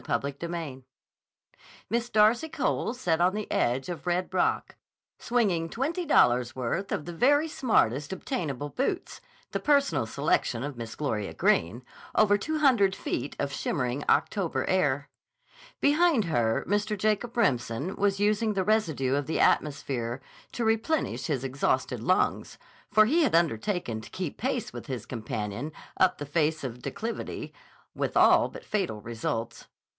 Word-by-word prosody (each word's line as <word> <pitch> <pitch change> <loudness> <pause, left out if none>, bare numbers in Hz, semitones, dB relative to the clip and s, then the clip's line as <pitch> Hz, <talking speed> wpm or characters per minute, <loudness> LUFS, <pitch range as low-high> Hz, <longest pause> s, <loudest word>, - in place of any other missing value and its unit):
CHAPTER 140 - 0
XV 160 -3 -6 1.0
MISS 235 +2 -1
DARCY 220 +8 +4
COLE 285 -5 -1
sat 175 -9 0
on 185 +3 +3
the 210 0 -4
edge 125 +3 +1
of 175 0 -6
Red 180 +1 0
Rock, 185 - 0 0.4
swinging 195 -9 +1
twenty 320 - -2
dollars' 120 - +3
worth 130 +10 -2
of - - -2
the 175 - -6
very 290 - +3
smartest 150 - +1
obtainable 145 - -3
boots, 345 - -3 0.3
the - - -1
personal 275 - +2
selection 130 -2 0
of 145 -1 -4
Miss 115 -2 -7
Gloria 110 -9 -3
Greene, 95 +10 +1 0.3
over 205 -1 +5
two 310 +10 -2
hundred 240 -10 +4
feet 145 - -4
of 140 -1 -2
shimmering 135 -2 -2
October 195 -6 +1
air. 145 -7 +1 0.7
Behind 295 - +4
her 120 -9 +1
Mr. 205 +2 0
Jacob 215 +4 0
Remsen 140 - 0
was 200 -1 +1
using 210 +1 +2
the 190 -2 0
residue 165 -12 +1
of 140 -1 0
the 160 - -1
atmosphere 135 -4 +1 0.3
to 235 - -2
replenish 225 +7 0
his 140 -5 -1
exhausted 130 -2 -1
lungs, 185 +10 0 0.3
for 215 0 +6
he 315 +10 +3
had 275 - +3
undertaken 165 - 0
to - - -12
keep 180 -6 -5
pace 250 -2 -2
with - - -8
his 130 -6 -4
companion 110 +3 -4 0.2
up 185 -1 +3
the 145 - -5
face 155 +1 0
of 130 -3 -3
the 125 - -16
declivity, 230 +2 -5 0.4
with - - -2
all - - +6
but - - -11
fatal 190 - -2
results. 115 +1 -4
175 Hz, 150 wpm, -28 LUFS, 130-220 Hz, 1.0 s, for